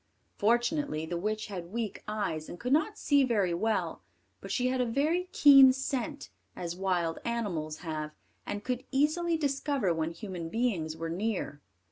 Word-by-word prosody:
Fortunately 240 - +1
the 175 - -4
witch 215 +5 -2
had 180 -3 -7
weak 225 -1 -3
eyes, 200 -7 -3
and 175 - -8
could 250 +2 0
not 305 +1 +2
see 285 -2 +3
very 205 -8 +1
well; 220 +6 -1 0.4
but - - -9
she 250 -1 +1
had 255 0 0
a - - +2
very 315 +9 0
keen 275 -2 +8
scent, 270 +2 -3 0.2
as 175 -1 -4
wild 180 -3 0
animals 180 -10 -2
have, 155 -1 -3 0.3
and 205 0 -5
could 250 +1 -2
easily 315 +5 +1
discover 280 - 0
when 160 0 -1
human 175 -2 -6
beings 180 -9 -1
were 165 0 -3
near. 185 -5 -2
220 Hz, 160 wpm, -30 LUFS, 170-270 Hz, 0.4 s, keen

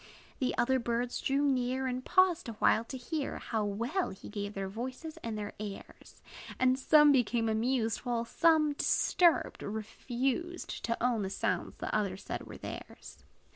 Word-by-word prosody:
The 255 - 0
other 260 +1 +3
birds 240 +1 -2
drew 275 +1 +1
near, 260 -1 +1
And 255 0 -2
paused 360 -5 +3
awhile 220 0 +3
to 260 - -6
hear 275 +4 -3
How 220 -2 -2
well 235 - -1
he 190 - -10
gave 205 0 -5
their 195 -1 -3
voices 255 +10 -6
and 225 -2 -5
their 205 0 -5
airs. 205 -2 -9 0.4
And 255 0 +3
some 295 +2 +6
became 240 -3 +2
amused; 225 +1 +1
While 240 -2 -2
some, 310 +2 +3
disturbed, 345 +3 +2
refused 250 +10 -3
To 230 0 -1
own 245 -3 +2
the 190 - -2
sounds - - -2
that - - -4
others 195 -2 -1
said - - -5
were - - -9
theirs. - - -9
245 Hz, 160 wpm, -31 LUFS, 220-275 Hz, 0.4 s, some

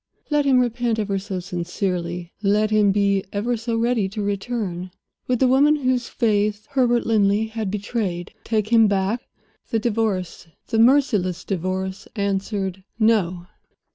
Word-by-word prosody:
Let 295 -1 +2
him 270 -2 +4
repent 240 -1 0
ever 200 -2 -1
so 190 -1 -4
sincerely, 175 -1 -3
let 210 +1 +2
him 210 -2 +4
be 200 -1 +2
ever 225 +4 -1
so 230 0 -2
ready 230 -4 +1
to 210 +1 -4
return, 200 -3 -3 0.4
would 250 - +2
the 260 - +3
woman 280 +4 +5
whose 255 -4 0
faith 210 -2 0
Herbert 245 -3 +2
Linley 210 -1 +2
had 220 -2 -3
betrayed 200 -3 -3
take 215 -2 -1
him 225 -2 +6
back? 200 +4 0 0.5
The 225 - +1
Divorce, 210 -7 -1 0.2
the 225 - +1
merciless 225 - +3
Divorce, 190 +1 -3
answered: 195 -2 -2
No! 195 -6 +2
210 Hz, 140 wpm, -22 LUFS, 190-230 Hz, 0.5 s, him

